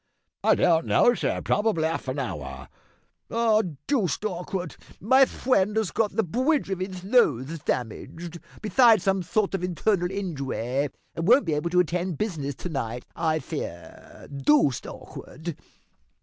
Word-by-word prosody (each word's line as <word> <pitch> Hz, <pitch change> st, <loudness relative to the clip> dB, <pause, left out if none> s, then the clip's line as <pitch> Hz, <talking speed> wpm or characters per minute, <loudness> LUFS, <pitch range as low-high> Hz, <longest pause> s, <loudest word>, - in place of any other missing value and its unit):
"Don't 165 Hz, -1 st, +3 dB
know, 240 Hz, -, +5 dB
sir, -, -, -2 dB
probably 210 Hz, -6 st, +1 dB
half 160 Hz, -3 st, -2 dB
an 130 Hz, +2 st, -2 dB
hour." 70 Hz, -, -5 dB, 0.6 s
"Aw! 225 Hz, -2 st, +3 dB, 0.2 s
Dooced 215 Hz, -, 0 dB
awkwad. 180 Hz, -2 st, -4 dB, 0.2 s
My 260 Hz, +6 st, +5 dB
fwend 215 Hz, -6 st, +1 dB
has 220 Hz, -5 st, 0 dB
got 215 Hz, -3 st, 0 dB
the 225 Hz, -, +2 dB
bwidge 255 Hz, -, 0 dB
of 190 Hz, -, -2 dB
his 185 Hz, -1 st, -5 dB
nose 165 Hz, -, +2 dB
damaged, 150 Hz, +8 st, -4 dB, 0.2 s
besides 225 Hz, -2 st, +5 dB
some 195 Hz, -1 st, +2 dB
sort 200 Hz, +4 st, 0 dB
of 190 Hz, -2 st, -2 dB
internal 180 Hz, +1 st, +1 dB
injuway, 140 Hz, -, -2 dB, 0.2 s
and 165 Hz, +1 st, -3 dB
won't 245 Hz, +1 st, +6 dB
be 160 Hz, -, 0 dB
able 150 Hz, +3 st, -1 dB
to 180 Hz, +1 st, +3 dB
attend 180 Hz, +2 st, 0 dB
to -, -, -9 dB
business 145 Hz, -9 st, -4 dB
to 180 Hz, -, -6 dB
night, 125 Hz, -5 st, -4 dB
I 160 Hz, -2 st, +1 dB
fear 135 Hz, -, -8 dB
dooced 140 Hz, -1 st, +2 dB
awkwad." 160 Hz, +3 st, -8 dB
180 Hz, 150 wpm, -26 LUFS, 150-215 Hz, 0.6 s, won't